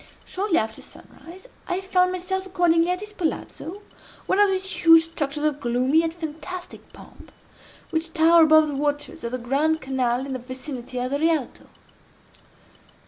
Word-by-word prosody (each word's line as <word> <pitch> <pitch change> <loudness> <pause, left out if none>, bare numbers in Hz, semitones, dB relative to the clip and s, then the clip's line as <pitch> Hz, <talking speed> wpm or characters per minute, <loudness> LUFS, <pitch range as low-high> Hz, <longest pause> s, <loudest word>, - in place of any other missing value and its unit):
Shortly 380 -2 0
after 220 0 -2
sunrise, 370 +8 -13 0.2
I 360 0 -1
found 365 -1 +2
myself 380 +1 -3
accordingly 345 -2 +2
at 360 +1 -1
his 420 0 -9
Palazzo, 365 +1 -4 0.4
one 380 - +1
of 410 -1 +5
those 380 0 -1 0.2
huge 330 -1 +7
structures 295 -2 -3
of 300 -1 0
gloomy, 255 +4 +2
yet 330 0 -1
fantastic 345 +2 -8
pomp, - - -15 0.6
which 325 0 -2
tower 330 +1 +5
above 315 -1 +6
the - - -4
waters 290 +4 -3
of 235 - -3
the 255 - -2
Grand 280 +6 0
Canal 260 -2 -1
in 275 - -5
the 260 - -4
vicinity 255 0 -7
of 250 +1 -2
the 280 - 0
Rialto. 315 -4 -1
320 Hz, 160 wpm, -24 LUFS, 275-360 Hz, 0.6 s, huge